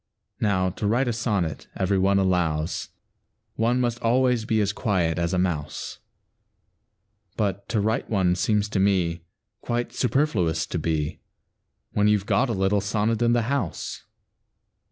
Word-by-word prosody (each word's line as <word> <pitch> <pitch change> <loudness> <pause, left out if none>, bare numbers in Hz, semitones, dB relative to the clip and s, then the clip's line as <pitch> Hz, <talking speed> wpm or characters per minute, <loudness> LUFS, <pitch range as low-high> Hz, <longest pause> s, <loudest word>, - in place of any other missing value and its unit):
Now, 95 -3 +1
to 105 +2 -3
write 120 +5 +2
a 120 - +1
sonnet, 100 - -2
every 95 0 +1
one 100 +1 +3
allows, 90 -4 0 0.6
One 120 +3 +1
must 120 -1 -1
always 125 -1 +2
be 110 -1 +1
as 105 -1 +1
quiet 90 -6 0
as 85 0 0
a 95 - 0
mouse; 75 -5 -2 1.4
But 100 -2 -2
to 110 - +1
write 110 +2 0
one 95 -4 +2
seems 105 +3 +1
to 100 - -1
me 90 -4 +1 0.4
Quite 120 0 -2
superfluous 105 - +1
to 85 - -3
be, 80 0 -2 0.7
When 105 0 +2
you 105 0 +5
've 100 - -8
got 125 +5 +2
a - - 0
little 95 +1 +1
sonnet 105 +3 0
in 120 0 +3
the 120 -1 +2
house. 120 - -3
100 Hz, 155 wpm, -25 LUFS, 90-115 Hz, 1.4 s, you